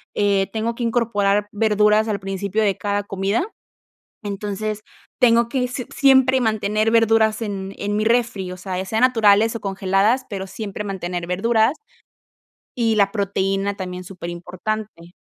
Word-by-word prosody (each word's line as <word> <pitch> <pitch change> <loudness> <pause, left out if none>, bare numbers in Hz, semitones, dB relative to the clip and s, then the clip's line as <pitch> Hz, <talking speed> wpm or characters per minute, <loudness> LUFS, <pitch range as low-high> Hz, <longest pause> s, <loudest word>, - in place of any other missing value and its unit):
eh, 200 -1 +1
tengo 225 +2 -2
que 240 - -9
incorporar 210 -4 +1
verduras 210 0 +3
al 210 -2 -1
principio 195 +2 -2
de 200 -2 +2
cada 205 0 -2
comida. 200 - -1 0.8
Entonces, 210 +1 -4 0.4
tengo 235 -1 +4
que 250 -1 -1
si 250 0 -5
siempre 265 -1 +4
mantener 215 -1 +1
verduras 225 -1 +3
en, 195 -3 -4
en 205 +1 -2
mi 215 - +1
refri, 225 -5 0
o 185 - -7
sea, 185 0 -5
ya 185 - -2
sea 220 +3 -1
naturales 225 -3 +4
o - - -6
congeladas, 195 +5 +1
pero 195 -3 -5
siempre 200 +1 -6
mantener 180 -3 -4
verduras 220 - +2 1.0
y 230 -3 +1
la 200 -2 +3
proteína 195 -1 -1
también, 180 -1 -6
superimportante. 180 +1 -6
205 Hz, 145 wpm, -21 LUFS, 195-225 Hz, 1.0 s, tengo